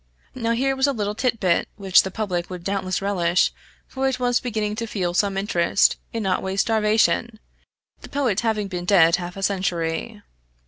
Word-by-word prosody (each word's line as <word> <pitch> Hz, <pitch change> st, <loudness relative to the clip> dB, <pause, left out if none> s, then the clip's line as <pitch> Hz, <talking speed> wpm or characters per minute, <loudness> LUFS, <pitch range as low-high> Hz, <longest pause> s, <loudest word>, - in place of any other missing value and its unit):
Now 230 Hz, -2 st, -1 dB
here 270 Hz, +3 st, 0 dB
was 265 Hz, +1 st, +2 dB
a 280 Hz, -, +1 dB
little 205 Hz, -3 st, -2 dB
tit 230 Hz, +1 st, -1 dB
bit 180 Hz, -3 st, +1 dB
which 195 Hz, -2 st, +4 dB
the 190 Hz, -, -5 dB
public 185 Hz, -4 st, -3 dB
would 180 Hz, -2 st, -7 dB
doubtless 195 Hz, -1 st, -2 dB
relish; 180 Hz, -3 st, +1 dB, 0.3 s
for 270 Hz, 0 st, -2 dB
it 260 Hz, -1 st, -1 dB
was 245 Hz, -1 st, +2 dB
beginning 215 Hz, -4 st, -2 dB
to 230 Hz, -, -3 dB
feel 180 Hz, -5 st, -2 dB
some 195 Hz, +1 st, +1 dB
interest 195 Hz, -2 st, +2 dB
in 225 Hz, -3 st, -3 dB
Otway's 190 Hz, +1 st, 0 dB
starvation, 220 Hz, +1 st, +1 dB, 0.6 s
the -, -, -11 dB
poet 255 Hz, -8 st, 0 dB
having 220 Hz, -3 st, -1 dB
been 180 Hz, -2 st, -5 dB
dead 175 Hz, -3 st, +5 dB
half 180 Hz, 0 st, -7 dB
a 195 Hz, -, -5 dB
century. 190 Hz, +2 st, -2 dB
200 Hz, 180 wpm, -23 LUFS, 185-230 Hz, 0.6 s, dead